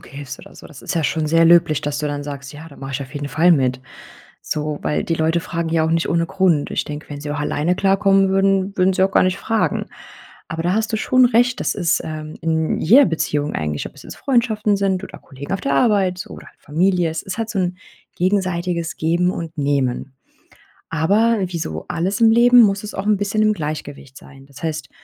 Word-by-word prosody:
Umzug - - -16
hilfst 140 -2 -8
oder - - -15
so. - - -12
Das 150 - -14
ist - - -4
ja 165 -2 0
schon 155 +1 0
sehr 165 +2 +4
löblich, 165 -3 +4
dass 145 -1 -2
du 150 - -2
dann 145 0 -3
sagst: 140 -2 -7
"Ja, 155 +2 -10
da 140 - -15
mache 135 0 -7
ich 140 - -3
auf 130 +1 -11
jeden 145 0 -4
Fall 170 +5 +4
mit" 130 -4 +1 0.6
so, 150 -1 -3
weil - - -1
die 165 - -1
Leute 160 +1 +1
fragen 165 0 -4
ja 160 -1 +1
auch 160 - -1
nicht 165 0 0
ohne 170 0 +1
Grund. 170 -5 +1
Ich - - -1
denke, 150 0 -7
wenn 145 -1 -7
sie 145 - -6
auch 145 - -3
alleine 150 +4 0
klarkommen 195 0 +3
würden, 195 0 +1
würden 185 +1 +3
sie 185 - +2
auch 195 - +1
gar - - +4
nicht 185 0 0
fragen. 225 -1 -1 0.6
Aber 165 -1 -4
da 175 +2 +1
hast 220 +1 -1
du - - +2
schon 255 +3 +4
recht. 245 +1 +2
Das - - -1
ist, 175 -5 +1
ähm, 155 0 -7
in 160 -1 0
jeder 255 - +6
Beziehung 150 -3 -1
eigentlich, 75 -1 -3
ob - - -17
es - - -14
jetzt - - -10
Freundschaften 225 -5 +1
sind 195 -1 0
oder - - -9
Kollegen 140 +5 -8
auf 195 - -3
der 140 - -1
Arbeit 185 - +2
oder - - -11
halt - - -19
Familie 175 +3 +1
Es 160 - -4
ist 190 +3 -6
halt 225 -1 -3
so 205 - -2
'n 180 -1 -1 0.4
gegenseitiges 180 -3 -1
Geben 175 +3 +1
und 165 -2 -7
Nehmen. 140 -2 -1 0.8
Aber 205 +9 +2
wie 175 -1 -5
so 80 - -5
alles 180 +5 -2
im 225 -1 +6
Leben 240 +1 +6
muss 200 -2 +2
es 210 - -7
auch 190 - -4
'n 210 -2 +3
bisschen 205 +2 -1
im 215 - +3
Gleichgewicht 150 -5 -6
sein. 135 0 -15
Das 140 - -15
heißt, 155 -4 -3
170 Hz, 230 wpm, -20 LUFS, 150-195 Hz, 0.8 s, jeder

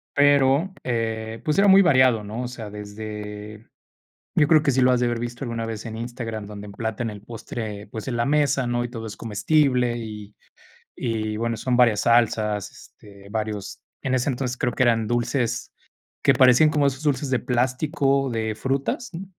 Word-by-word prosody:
pero, 145 +5 +4
eh, 115 -2 -3
pues 150 +2 +1
era 200 - +5
muy 195 +1 +8
variado, 130 - +4
¿no? 110 +4 -5
O - - -3
sea, 120 -4 -8
desde 105 +1 -8 0.7
Yo 150 - +4
creo 155 -1 +5
que 140 - +2
si 130 0 +2
lo 130 - +5
has 125 - +2
de 125 - +2
haber 120 -1 -1
visto 120 +2 -5
alguna 115 -2 -3
vez 115 -1 -6
en 110 -1 -6
Instagram, 115 -2 -5
donde 105 0 -9
emplatan 110 +3 -4
el 105 -1 -10
postre, 110 -2 -6
pues 110 - -7
en 120 - -2
la 120 - +1
mesa, 140 -2 +2
¿no?, 120 0 0
y - - -3
todo 115 -2 -6
es 105 - -7
comestible 125 +2 +1
y 105 -2 -8 0.6
y 110 -2 -2
bueno, 115 +1 -1
son 125 +2 0
varias 115 -4 +4
salsas, 110 -3 +2
este, 100 -1 -16
varios 105 -2 -4 0.2
En 130 - 0
ese 130 +2 +1
entonces 125 -1 -3
creo 125 -2 -1
que 130 - +2
eran 115 -2 +2
dulces 120 0 -1 0.5
que - - +5
parecían 130 +4 +6
como 145 -2 +2
esos 135 +1 -2
dulces 145 -2 0
de 130 - +2
plástico, 135 +2 0
de 110 -2 -2
frutas, 135 - -2
¿mm? 170 +3 -6
120 Hz, 190 wpm, -23 LUFS, 110-130 Hz, 0.7 s, muy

